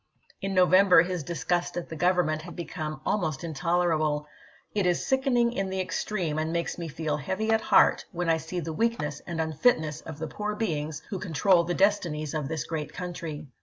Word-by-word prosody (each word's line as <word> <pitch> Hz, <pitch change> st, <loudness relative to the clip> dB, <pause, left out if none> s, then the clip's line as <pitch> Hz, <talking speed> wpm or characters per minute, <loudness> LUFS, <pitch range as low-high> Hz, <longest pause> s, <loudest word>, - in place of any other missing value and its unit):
In 195 Hz, 0 st, -2 dB
No 185 Hz, 0 st, +6 dB
ibid.,p. 185 Hz, +1 st, +5 dB
leo. 195 Hz, -, +7 dB
vember 180 Hz, -4 st, +6 dB
his 180 Hz, -2 st, -3 dB
disgust 175 Hz, +3 st, -1 dB
at 175 Hz, -, -3 dB
the 160 Hz, -, -6 dB
Government 175 Hz, -2 st, +2 dB
had 175 Hz, +2 st, -10 dB
become 155 Hz, -3 st, -5 dB
almost 160 Hz, -7 st, -1 dB
intolerable: 160 Hz, -2 st, 0 dB, 0.2 s
" -, -, -30 dB
It 200 Hz, -3 st, +1 dB
is 175 Hz, -1 st, +1 dB
sickening 255 Hz, -3 st, +2 dB
in 195 Hz, -4 st, -2 dB
the 190 Hz, 0 st, -3 dB
extreme, 180 Hz, -4 st, -2 dB
and 160 Hz, +1 st, -1 dB
makes 170 Hz, +1 st, -2 dB
me 170 Hz, -, -4 dB
feel 155 Hz, -1 st, -2 dB
heavy 190 Hz, +9 st, -1 dB
at 220 Hz, 0 st, +3 dB
heart, -, -, +4 dB
when 175 Hz, -2 st, -3 dB
I 165 Hz, -1 st, +4 dB
see 160 Hz, +3 st, -4 dB
the 160 Hz, -1 st, -4 dB
weakness 155 Hz, -9 st, -1 dB
and 170 Hz, -2 st, -4 dB
unfitness 160 Hz, -, +1 dB
of 160 Hz, -2 st, -8 dB
the 160 Hz, -, -4 dB
poor 210 Hz, +4 st, -3 dB
beings 155 Hz, -7 st, -2 dB
who 195 Hz, -, -2 dB
control 175 Hz, 0 st, +3 dB
the 175 Hz, 0 st, -1 dB
destinies 170 Hz, -7 st, +1 dB
of 150 Hz, -3 st, -2 dB
this 160 Hz, -2 st, -2 dB
great 150 Hz, +1 st, -4 dB
country." 170 Hz, -4 st, -5 dB
170 Hz, 205 wpm, -27 LUFS, 155-185 Hz, 0.2 s, leo